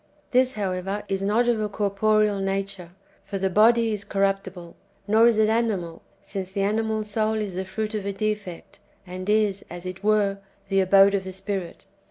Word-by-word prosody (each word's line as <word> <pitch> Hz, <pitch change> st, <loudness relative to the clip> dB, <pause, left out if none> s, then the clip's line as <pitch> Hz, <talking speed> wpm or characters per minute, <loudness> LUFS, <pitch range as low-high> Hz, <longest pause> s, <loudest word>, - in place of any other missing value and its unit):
This, 255 Hz, 0 st, +3 dB
how 200 Hz, -3 st, -1 dB
ever, 195 Hz, +3 st, -3 dB
is 195 Hz, 0 st, -1 dB
not 215 Hz, +5 st, +2 dB
of 235 Hz, -2 st, +2 dB
a 210 Hz, -, -1 dB
corporeal 210 Hz, 0 st, +1 dB
nature, 195 Hz, -2 st, -3 dB, 0.3 s
for 200 Hz, -, -5 dB
the 190 Hz, 0 st, -1 dB
body 225 Hz, +3 st, +4 dB
is 205 Hz, -1 st, -4 dB
corruptible; 195 Hz, -3 st, -2 dB, 0.3 s
nor 220 Hz, +3 st, +5 dB
is 235 Hz, -2 st, +3 dB
it 215 Hz, -1 st, +4 dB
animal, 215 Hz, -7 st, -1 dB, 0.2 s
since 190 Hz, -1 st, -6 dB
the 195 Hz, 0 st, -1 dB
animal 220 Hz, +1 st, 0 dB
soul 215 Hz, +1 st, -1 dB
is 210 Hz, -3 st, -3 dB
the 190 Hz, +1 st, -3 dB
fruit 215 Hz, +3 st, -4 dB
of 205 Hz, -2 st, -3 dB
a -, -, 0 dB
defect, 205 Hz, -3 st, -4 dB, 0.3 s
and 185 Hz, +1 st, -6 dB
is, 210 Hz, -2 st, +2 dB
as 175 Hz, +1 st, -8 dB
it 185 Hz, +1 st, -7 dB
were, 205 Hz, -2 st, +2 dB, 0.3 s
the 195 Hz, -1 st, +2 dB
abode 195 Hz, +1 st, +5 dB
of 195 Hz, -1 st, 0 dB
the 190 Hz, 0 st, -7 dB
spirit. 190 Hz, -2 st, -5 dB
200 Hz, 190 wpm, -24 LUFS, 190-215 Hz, 0.3 s, nor